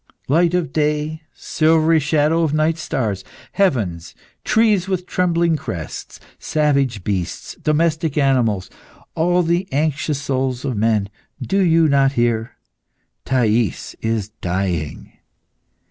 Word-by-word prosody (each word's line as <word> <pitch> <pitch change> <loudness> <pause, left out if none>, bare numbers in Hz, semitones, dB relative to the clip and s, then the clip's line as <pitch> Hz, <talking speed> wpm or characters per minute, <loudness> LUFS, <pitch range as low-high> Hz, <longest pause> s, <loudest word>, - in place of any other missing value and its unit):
"Light 170 +5 +3
of 165 -7 -1
day, 150 +1 -1
silvery 160 0 +2
shadows 155 +2 +2
of - - -4
night 155 +2 +1
stars, 110 - -2 0.3
heavens, 100 - 0 0.3
trees 215 -4 +2
with 185 -2 -2
trembling 170 -3 +1
crests, 85 - -7 0.2
savage 140 - 0
beasts, 95 -4 -3
domestic 155 -1 0
animals, 125 -9 +2 0.5
all 175 +2 +2
the 175 +3 -1
anxious 145 0 0
souls 130 -2 -2
of 130 -4 -2
men, 105 -1 +1 0.3
do 195 - -1
you 165 -3 +4
not 140 -1 +3
hear? 120 -2 0 0.7
'Thais 115 - 0
is 110 -2 -1
dying! 90 -4 -3
145 Hz, 115 wpm, -20 LUFS, 115-165 Hz, 0.7 s, you